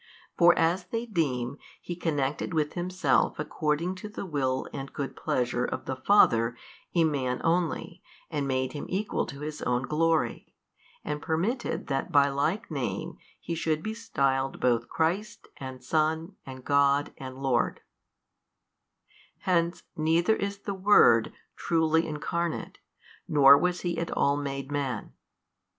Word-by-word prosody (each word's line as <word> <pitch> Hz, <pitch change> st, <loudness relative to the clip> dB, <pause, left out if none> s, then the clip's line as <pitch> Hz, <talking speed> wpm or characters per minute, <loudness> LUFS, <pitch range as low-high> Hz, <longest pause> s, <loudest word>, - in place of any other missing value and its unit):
for 175 Hz, 0 st, +6 dB
as 175 Hz, +3 st, +2 dB
they 230 Hz, +5 st, -3 dB
deem, 140 Hz, -, -1 dB, 0.2 s
He 175 Hz, -, -6 dB
connected 150 Hz, -1 st, -1 dB
with 150 Hz, -1 st, 0 dB
Himself 180 Hz, +1 st, +1 dB
according 155 Hz, +3 st, -1 dB
to 210 Hz, +3 st, -7 dB
the 210 Hz, -, -6 dB
Will 130 Hz, -6 st, -1 dB
and 135 Hz, -1 st, -6 dB
Good 140 Hz, -2 st, -5 dB
pleasure 125 Hz, 0 st, -1 dB
of -, -, -3 dB
the 130 Hz, -, -3 dB
Father 120 Hz, -, +4 dB, 0.4 s
a 170 Hz, -, +5 dB
man 130 Hz, -5 st, 0 dB
only 170 Hz, 0 st, -1 dB, 0.3 s
and 145 Hz, -2 st, -1 dB
made 130 Hz, -1 st, -1 dB
him 145 Hz, -, -6 dB
equal 205 Hz, +3 st, -1 dB
to 140 Hz, +1 st, -8 dB
His 150 Hz, 0 st, -5 dB
own 125 Hz, +1 st, 0 dB
glory, 160 Hz, +2 st, 0 dB, 0.5 s
and 150 Hz, 0 st, -3 dB
permitted 180 Hz, -, -1 dB
that 135 Hz, -2 st, -2 dB
by 140 Hz, -1 st, +5 dB
like 145 Hz, +9 st, -1 dB
name -, -, -3 dB, 0.2 s
he 170 Hz, -, -5 dB
should 160 Hz, -1 st, -1 dB
be 220 Hz, -, -3 dB
styled 135 Hz, -12 st, -1 dB
both 120 Hz, -2 st, +1 dB
Christ 195 Hz, +6 st, -1 dB
and 130 Hz, -2 st, -8 dB
Son 160 Hz, +6 st, 0 dB
and 130 Hz, -1 st, -9 dB
God 140 Hz, 0 st, +3 dB
and 130 Hz, -1 st, -7 dB
Lord: 135 Hz, -2 st, 0 dB, 1.6 s
hence 170 Hz, -2 st, +1 dB
neither 165 Hz, +6 st, +2 dB
is 200 Hz, -1 st, -3 dB
the 200 Hz, -, -3 dB
Word 190 Hz, -, +5 dB, 0.2 s
truly 160 Hz, 0 st, +1 dB
Incarnate 165 Hz, +2 st, -3 dB, 0.5 s
nor 140 Hz, -2 st, +8 dB
was 180 Hz, +4 st, 0 dB
He 170 Hz, -2 st, -2 dB
at 165 Hz, -, -2 dB
all 140 Hz, -, +2 dB
made 140 Hz, -1 st, -4 dB
man. 135 Hz, -7 st, -3 dB
155 Hz, 140 wpm, -28 LUFS, 135-175 Hz, 1.6 s, nor